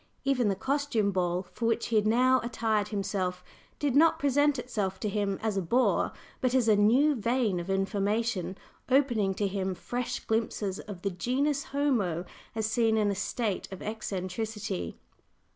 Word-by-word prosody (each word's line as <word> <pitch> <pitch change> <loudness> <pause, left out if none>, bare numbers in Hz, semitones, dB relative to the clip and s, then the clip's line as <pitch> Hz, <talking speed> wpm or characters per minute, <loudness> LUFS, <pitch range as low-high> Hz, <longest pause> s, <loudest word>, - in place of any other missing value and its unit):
Even 260 -4 +2
the 195 - +1
costume 265 -3 0
ball 180 -1 0
for 230 - -1
which 230 0 0
he 230 - 0
had 215 0 +3
now 255 +3 +4
attired 225 -3 0
himself 195 -3 -2 0.3
did 285 -3 0
not 320 +3 +5
present 285 +1 +2
itself 205 -6 -3
to 215 - -2
him 200 -1 -1
as 215 -3 0
a - - +2
"bore," 240 +9 +2 0.3
but 255 0 +1
as 250 -3 +3
a 215 - +6
new 245 +9 +4
vein 230 -5 0
of 175 +2 -6
information, 195 0 0 0.3
opening 240 -8 +2
to 205 - 0
him 190 -1 -2
fresh 245 +6 -3
glimpses 220 -3 -1
of 195 -4 -9
the 200 - 0
genus 270 +10 0
homo 225 - 0 0.3
as 220 -1 0
seen 225 0 +2
in 210 -1 +2
a - - -2
state 205 +1 -2
of 190 - -7
eccentricity. 210 - -4
215 Hz, 165 wpm, -29 LUFS, 195-250 Hz, 0.3 s, a